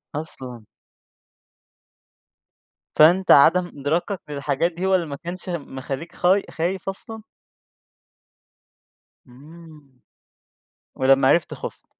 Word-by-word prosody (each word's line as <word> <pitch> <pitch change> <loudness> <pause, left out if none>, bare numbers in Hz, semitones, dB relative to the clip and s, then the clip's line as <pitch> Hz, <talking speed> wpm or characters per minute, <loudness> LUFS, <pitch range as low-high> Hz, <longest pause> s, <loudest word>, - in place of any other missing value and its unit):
أصلًا! 130 -7 -6 2.3
فأنت 175 +5 +5
عَدَم 175 +5 +6
إدراكك 165 +6 -3
للحجات 145 +4 -1
دي 175 +3 -5
هو 190 0 +3
اللي 175 - 0
ما 145 -3 -6
كانش 175 +4 -8
مخلّيك 140 -1 -6
خاي 190 +3 +2
خايف 180 +3 -3
أصلًا؟ 220 +3 -7 2.1
إمم. 150 0 -16 1.0
ولمّا 135 0 +3
عرفت 170 - +2
خُفت. - - -9
160 Hz, 90 wpm, -22 LUFS, 140-180 Hz, 2.3 s, عَدَم